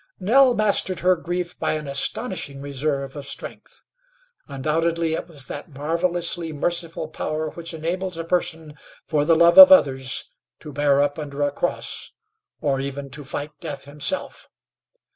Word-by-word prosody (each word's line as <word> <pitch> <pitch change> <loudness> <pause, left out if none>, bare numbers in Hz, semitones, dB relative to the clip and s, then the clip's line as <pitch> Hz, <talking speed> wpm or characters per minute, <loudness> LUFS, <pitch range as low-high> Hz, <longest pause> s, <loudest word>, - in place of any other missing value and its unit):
Nell 245 +6 +5
mastered 200 -4 +1
her 185 +1 +4
grief 175 +1 -4
by - - 0
an 155 -1 -4
astonishing 140 - -2
reserve 140 0 -3
of 140 -1 -7
strength. - - -8 0.6
Undoubtedly 160 +4 0
it 165 - -3
was 145 -6 -6
that - - -8
marvelously 170 +3 -1
merciful 165 +1 -2
power 155 0 -3
which 170 -1 -7
enables 175 +3 -3
a 165 - -3
person, 165 -2 -2 0.3
for 150 -2 0
the 165 +1 +4
love 170 - +6
of 285 0 +12
others, 135 - +3 0.3
to 150 -2 -9
bear 145 0 +3
up 145 +1 -2
under 145 -1 -4
a 145 - +1
cross, 175 +5 -3 0.5
or 135 -2 0
even 140 0 -5
to 145 +3 -7
fight 145 +2 -5
death 145 -5 -7
himself. 150 - -4
155 Hz, 150 wpm, -23 LUFS, 145-175 Hz, 0.6 s, of